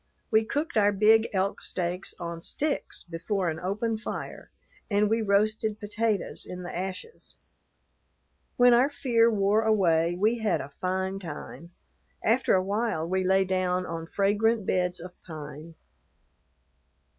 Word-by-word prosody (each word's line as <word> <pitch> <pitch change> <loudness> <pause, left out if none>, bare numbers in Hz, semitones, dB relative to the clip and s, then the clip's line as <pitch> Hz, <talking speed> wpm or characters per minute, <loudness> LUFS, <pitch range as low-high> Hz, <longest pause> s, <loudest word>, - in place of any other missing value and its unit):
We 220 0 +4
cooked 295 +3 -2
our 205 -1 +5
big 220 +3 +4
elk 195 0 -1
steaks 180 +1 -3
on 170 -1 -5
sticks 295 - -3
before 175 +2 -2
an 160 - -6
open 215 +5 -2
fire, - - -6 0.4
and 205 0 +3
we 225 +1 +2
roasted 215 +1 +1
potatoes 215 0 -2
in 180 0 -7
the 175 - -6
ashes. 190 - -7 1.2
When 245 0 +7
our 250 +4 +4
fear 235 -5 +3
wore 205 0 +2
away, 175 -6 +2
we 220 +4 +2
had 215 -4 +1
a 140 +1 -8
fine 190 +1 -1
time. 170 0 -8 0.5
After 235 +1 +3
a 185 - +2
while 200 -5 -1
we 185 +1 0
lay 190 +1 +3
down 185 -1 0
on 165 -1 -5
fragrant 210 +3 +1
beds 180 -1 0
of 180 +1 -9
pine. 155 0 -9
195 Hz, 140 wpm, -27 LUFS, 180-220 Hz, 1.2 s, When